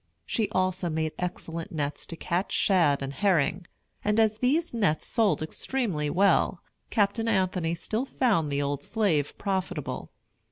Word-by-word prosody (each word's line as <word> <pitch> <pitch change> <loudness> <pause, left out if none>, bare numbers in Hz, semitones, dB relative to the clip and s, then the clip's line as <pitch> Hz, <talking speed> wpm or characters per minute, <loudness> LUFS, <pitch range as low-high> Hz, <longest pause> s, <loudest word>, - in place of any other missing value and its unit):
She 220 -3 0
also 185 -1 0
made 160 0 -1
excellent 170 -2 -4
nets 145 -2 -3
to 165 - -5
catch 175 +3 -2
shad 165 -8 +3
and 135 0 -4
herring; 175 -1 +1 0.4
and, 210 +1 +2
as 220 -1 +3
these 300 +7 +1
nets 200 -10 +1
sold 215 -8 +2
extremely 165 - -2
well, 185 +1 +3 0.3
Captain 215 +2 +1
Anthony 185 -5 +1
still 220 +8 -2
found 205 - +1
the 140 0 0
old 140 0 -2
slave 180 -11 0
profitable. 185 -6 -3
185 Hz, 145 wpm, -27 LUFS, 155-210 Hz, 0.4 s, shad